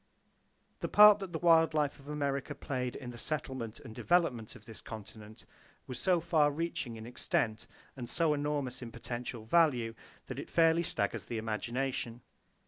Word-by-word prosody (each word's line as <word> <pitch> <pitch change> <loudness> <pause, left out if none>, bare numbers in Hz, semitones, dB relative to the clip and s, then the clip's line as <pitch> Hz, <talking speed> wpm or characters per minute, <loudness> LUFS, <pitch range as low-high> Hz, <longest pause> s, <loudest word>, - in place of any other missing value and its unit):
The - - -2
part 210 0 +8
that 195 -3 -6
the 165 - -2
wild 165 -2 +4
life 150 -2 0
of 140 - -16
America 140 -2 -2
played 125 -2 -3
in 125 -3 -7
the 120 - -9
settlement 130 -7 -4
and 120 -6 -10
development 135 -9 +1
of 105 - -15
this 110 -2 -11
continent 110 0 -10 0.4
was 125 -1 -6
so 180 -2 +3
far 160 -3 +3
reaching 145 -6 -3
in 110 0 -8
extent, 110 -2 -1 0.3
and 120 -3 -7
so 165 0 +2
enormous 145 -3 -2
in 120 -2 -7
potential 120 -1 -6
value, 125 -5 +3 0.3
that - - -6
it - - -7
fairly 165 0 +4
staggers 100 -11 -1
the 115 - -3
imagination. 120 +2 -3
130 Hz, 165 wpm, -32 LUFS, 115-160 Hz, 0.4 s, part